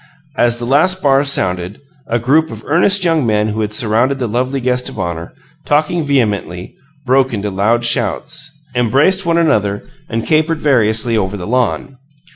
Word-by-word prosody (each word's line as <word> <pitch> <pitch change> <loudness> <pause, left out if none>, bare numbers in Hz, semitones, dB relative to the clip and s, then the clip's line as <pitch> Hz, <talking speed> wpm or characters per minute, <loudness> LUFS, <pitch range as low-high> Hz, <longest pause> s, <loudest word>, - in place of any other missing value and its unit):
As 120 0 +2
the 120 - -4
last 160 +9 +2
bars 140 0 +3
sounded, 90 -1 -2 0.3
a 120 - 0
group 145 +7 +1
of - - -9
earnest 185 +5 +2
young 165 -3 +2
men 105 -2 0
who 110 +1 -3
had 105 -1 -2
surrounded 115 +5 +1
the 130 - -2
lovely 130 +5 -2
guest 125 0 -1
of - - -11
honor, 85 -3 -4 0.3
talking 155 +3 0
vehemently, 105 - -2 0.3
broke 130 -1 +2
into 105 0 -4
loud 110 +5 0
shouts, 145 +5 0 0.2
embraced 140 - +2
one 170 0 +2
another 105 -12 +1 0.3
and 115 0 -3
capered 155 0 +1
variously 115 -5 +2
over 100 -1 -1
the 90 - -7
lawn. 125 +3 -2
125 Hz, 165 wpm, -15 LUFS, 105-145 Hz, 0.3 s, bars